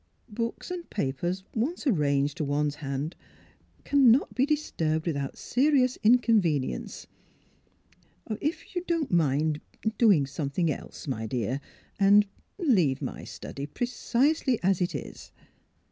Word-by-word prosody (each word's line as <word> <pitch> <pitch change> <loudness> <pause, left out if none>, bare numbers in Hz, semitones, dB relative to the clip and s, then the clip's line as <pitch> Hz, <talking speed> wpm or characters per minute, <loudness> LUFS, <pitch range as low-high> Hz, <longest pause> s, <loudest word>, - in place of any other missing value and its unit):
Books 230 +9 -4
and 355 -2 -6
papers 175 +3 -2
once 275 +10 -2
arranged 145 - +1
to 160 - -1
one 145 +1 0
's - - -11
hand 140 +2 -4 0.7
cannot 270 -2 +4
be 265 +3 +2
disturbed 160 - -1
with 165 -4 0
out 140 -1 -4
serious 260 -1 +2
inconvenience. 210 - +2 1.2
If 300 - -4
you 355 - -1
don 335 -3 +1
't - - -15
mind 150 -2 +2
— - - -25
er 220 - +2
— - - -38
doing 200 - +5
something 145 +4 -1
else, 145 - -8
my 110 -5 -3
dear; 125 +4 -2 0.4
and 205 +1 +6 0.2
— - - -39
ah - - -5
— - - -1
leave 150 - +2
my - - -5
study 140 +1 -7
precisely 250 - +1
as 190 0 +2
it 175 - 0
is." - - -8
180 Hz, 150 wpm, -27 LUFS, -, 1.2 s, and